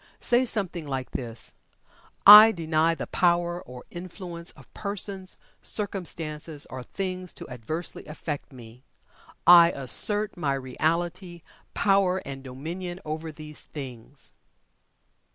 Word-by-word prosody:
Say 245 +2 +3
something 185 -9 -2
like 130 -2 -4
this, 115 -3 -5 0.7
"I 210 +2 +12
DENY 165 -1 +1
the - - -4
power 175 0 +1
or 125 0 -11
influence 175 -1 -7
of - - -19
persons, 200 -2 -4 0.2
circumstances, 160 -7 -4
or 130 - -6
things 185 +5 -5
to - - -8
adversely 130 +10 -6
affect 150 -1 -6
me. 120 -1 -13 0.6
I 170 -1 +9
ASSERT 205 - +1
my 145 -5 0
Reality, 170 +6 -2 0.3
Power 195 -2 +3
and 135 -1 -7
Dominion 170 +8 -6
over 155 +1 -4
these 150 0 -8
things." 135 -1 -9
165 Hz, 115 wpm, -26 LUFS, 140-185 Hz, 0.7 s, I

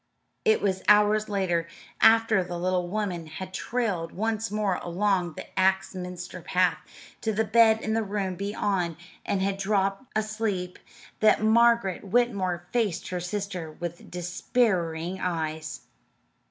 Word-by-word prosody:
It 440 -1 +3
was 190 -2 0
hours 210 +1 +5
later, 180 -5 0 0.3
after 225 -3 +5
the 175 0 -5
little 180 0 0
woman 180 -4 -3
had 185 +4 -8
trailed 200 -7 -2
once 220 +2 -1
more 210 -3 0
along 180 -1 0
the - - -8
Axminster 185 -1 -1
path 180 0 +1 0.4
to 220 - 0
the 220 +1 +1
bed 220 +1 +5
in 220 - -1
the 225 - +2
room 200 -2 -2
beyond 195 -3 -1 0.3
and 190 -1 0
had 195 0 0
dropped 195 +2 0
asleep, 215 -4 -2 0.4
that 215 0 +4
Margaret 230 -3 +4
Whitmore 195 -5 0
faced 220 -8 0
her 180 - -2
sister 180 -3 -4
with 175 +1 -7
despairing 180 -1 -1
eyes. 155 -5 -3
195 Hz, 130 wpm, -27 LUFS, 180-215 Hz, 0.4 s, hours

